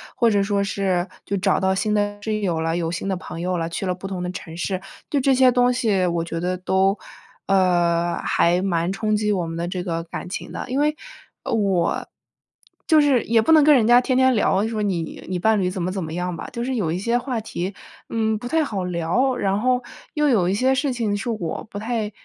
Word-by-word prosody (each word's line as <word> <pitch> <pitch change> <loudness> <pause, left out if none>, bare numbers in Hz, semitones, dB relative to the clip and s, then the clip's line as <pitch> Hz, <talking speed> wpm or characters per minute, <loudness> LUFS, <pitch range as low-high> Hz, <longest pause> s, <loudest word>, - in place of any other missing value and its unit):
或 235 - +3
者 205 -2 +2
说 200 0 0
是 190 -2 -1 0.2
就 200 - -1
找 185 - +2
到 190 0 +2
新 210 +2 0
的 205 0 0
室 215 0 -2
友 175 -6 -1
了， 165 0 -1
有 165 -1 -1
新 175 +3 -4
的 190 - 0
朋 175 - -8
友 180 +1 -1
了， 165 -1 -2
去 170 - -4
了 185 - 0
不 190 +2 -7
同 190 -2 -4
的 180 - -3
城 165 -3 -8
市， 185 +1 -2 0.3
对 285 - +1
这 270 +1 +3
些 255 0 +5
东 245 0 +3
西 215 -7 +1
我 170 -1 0
觉 165 0 -4
得 180 +2 -1
都， 190 +2 +1 0.5
呃， 175 -3 +2
还 175 +2 +2
蛮 175 -2 0
冲 215 +2 0
击 210 0 +1
我 180 -4 0
们 165 - -5
的 170 +1 -2
这 180 0 -3
个 165 -2 -3
感 170 - -7
情 - - -6
的。 - - -6
因 260 +2 0
为， 300 +1 +2 0.5
呃， - - -3
我， 195 -5 +1 0.8
就 315 -2 +6
是 275 -5 +3
也 225 0 +3
不 220 - +1
能 310 -2 +7
跟 305 - +7
人 235 -5 +4
家 240 +1 +7
天 255 0 0
天 260 0 +5
聊， 205 -1 +2
说 220 -2 -3
你 180 -6 -3
你 180 0 -2
伴 220 +2 +3
侣 180 - +1
怎 185 0 -4
么 180 - -1
怎 190 0 -3
么 160 0 -6
样 180 +1 -2
吧。 - - -7
就 235 -1 -3
是 260 +1 -2
有 185 -9 0
一 170 - -1
些 235 +5 +1
话 245 -1 -2
题， 190 -3 -4 0.4
嗯， 220 -1 0
不 245 - -7
太 320 +5 +2
好 205 -9 -3
聊， 180 +10 0
然 195 -1 0
后 250 +1 +1 0.3
又 300 -1 +2
有 205 -9 +3
一 - - +1
些 255 +6 +2
事 275 -1 0
情 220 -4 -1
是 230 +4 -4
我 210 -8 -3
不 205 - -7
太 220 -1 -2
200 Hz, 260 characters per minute, -22 LUFS, 180-235 Hz, 0.8 s, 能